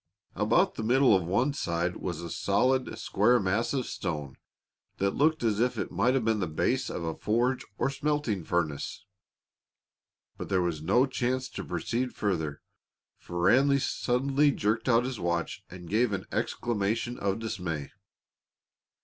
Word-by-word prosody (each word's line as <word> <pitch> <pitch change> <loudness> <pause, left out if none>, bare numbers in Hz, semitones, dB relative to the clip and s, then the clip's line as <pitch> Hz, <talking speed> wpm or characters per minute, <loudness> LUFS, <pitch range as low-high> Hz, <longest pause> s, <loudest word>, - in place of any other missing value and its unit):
About - - +2
the - - -5
middle 125 0 +5
of 95 - +1
one 120 - +1
side 85 - -1
was 85 -3 -4
a 85 -1 -6
solid, 125 +6 +1
square 120 +5 +3
mass 100 +4 0
of 130 -3 -1
stone 75 -7 -4 0.6
that 100 0 +1
looked 155 +3 +2
as 110 -3 +1
if 125 +2 +1
it - - -3
might 115 +9 +2
have 130 -4 0
been 110 -1 +2
the 95 - -1
base 80 - 0
of - - -4
a 80 0 -2
forge 120 +7 0
or 135 - 0
smelting 140 - -1
furnace. 80 -4 -2 1.3
But - - -5
there 95 -2 +2
was 85 -3 -2
no 100 +11 +3
chance 130 0 -1
to - - -6
proceed 125 +2 -2
further, 80 -8 -2 0.6
for 85 0 -4
Ranny 140 +7 +5
suddenly 135 +2 +1
jerked 115 -1 0
out 120 0 +4
his 130 -3 -4
watch 85 -1 -2
and 90 -1 -10
gave 110 +4 +2
an 95 - -3
exclamation 115 +2 -1
of 100 0 0
dismay. 90 -10 -4
110 Hz, 160 wpm, -28 LUFS, 90-125 Hz, 1.3 s, middle